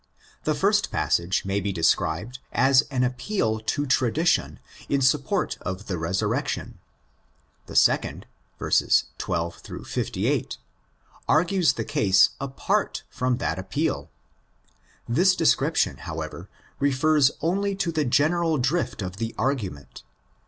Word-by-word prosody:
The - - +1
first - - +2
passage 90 +3 0
may 95 +1 0
be 100 0 -2
described 90 +6 0
as 135 0 +5
an 130 -3 0
appeal 125 - -1
to 145 +7 -1
tradition 130 +5 +1 0.3
in 140 - +2
support 130 0 +1
of 95 +2 -5
the 95 - -3
resurrection; 85 +4 -2 0.9
the - - -9
second - - +2 0.3
(12 85 +1 0 0.3
58) - - -2 0.7
argues 175 +2 +3
the - - -3
case 100 -10 +4
apart 135 -1 -1
from 125 -1 0
that - - -2
appeal. 95 0 -2 1.0
This 180 +10 +3
description, 165 - +2
however, - - -7 0.3
refers 140 +1 +3
only 195 +4 0
to 180 -3 -1
the 155 -2 0
general 155 +5 +2
drift 135 - -1
of 90 0 -6
the 115 +1 -4
argument. 105 - -3
130 Hz, 115 wpm, -25 LUFS, 100-155 Hz, 1.0 s, as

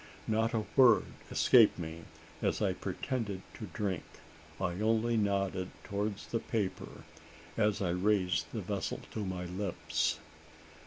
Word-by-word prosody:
Not 110 +1 +1
a 110 -1 0
word 125 -5 +7 0.2
escaped 115 -4 +6
me, 80 -1 -6 0.4
as - - +1
I - - +2
pretended 105 -7 -3
to - - -7
drink. 95 -5 -2 0.6
I 90 +3 -1
only 115 +2 +2
nodded 100 -3 0
towards 100 0 -3
the 115 - -1
paper 105 -5 -3 0.5
as 105 -2 +2
I 90 - +1
raised 90 -1 +2
the - - -3
vessel - - -3
to 110 - -3
my 90 -2 -3
lips. 90 +1 -1
100 Hz, 130 wpm, -32 LUFS, 95-110 Hz, 0.6 s, word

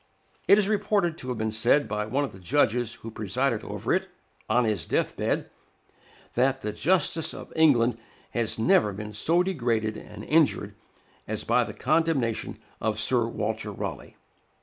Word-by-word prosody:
It 200 - +7
is 205 -2 +2
reported 205 -5 +1
to 130 - -7
have 125 - -2
been 110 0 -1
said 120 +7 +3
by 105 0 -2
one 135 +6 0
of 140 - -3
the 95 - -12
judges 120 +1 +1
who 115 - -5
presided 105 -4 -1
over - - -2
it, - - 0 0.4
on 120 +2 +3
his 105 -8 -1
death - - 0
bed, - - -1 0.9
that 135 +2 +2
"the 105 - -2
justice 165 - +1
of - - -10
England 125 -7 +4 0.3
had 115 -2 -1
never 115 - +3
been 105 +2 -7
so 165 - +2
degraded 120 - -1
and - - -10
injured 155 -1 +2 0.5
as - - -3
by - - +3
the - - -7
condemnation 150 -6 0 0.2
of 110 -1 0
Sir 120 +1 +1
Walter 110 -1 -3
Raleigh." 100 - -6
120 Hz, 165 wpm, -26 LUFS, 110-160 Hz, 0.9 s, It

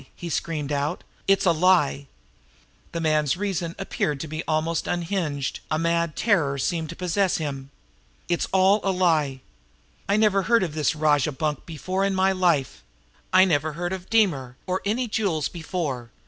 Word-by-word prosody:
he 170 -1 -6
screamed 150 -2 -2
out. 145 +4 -1 0.2
"It's 195 0 +3
a 180 - +5
lie!" 155 - +2 0.8
The 170 - -3
man's 155 -1 +1
reason 180 -4 -2
appeared 150 -6 -2
to 160 - -5
be 155 +1 -4
almost 160 +1 0
unhinged; 170 -6 -2
a 155 - +1
mad 170 -1 0
terror 165 -11 +1
seemed 160 +3 -1
to 170 - -6
possess 185 +2 0
him. 140 -4 -5 0.6
"It's 175 -1 0
all 190 +2 +4
a 195 - +1
lie! 160 -8 +1 0.7
I 200 - +3
never 210 -2 +3
heard 230 +1 +3
of 165 -5 -3
this 155 0 0
rajah 150 -1 +2
bunk 150 +1 -3
before 185 +4 -2
in 195 -1 +1
my 190 +1 +3
life! 175 -8 +1 0.5
I 185 0 +7
never 155 -3 +1
heard 175 +3 -3
of 185 -1 -7
Deemer, 145 - +1
or 185 0 -1
any 235 +5 0
jewels 195 -9 0
before. 150 -8 -4
170 Hz, 165 wpm, -24 LUFS, 150-190 Hz, 0.8 s, I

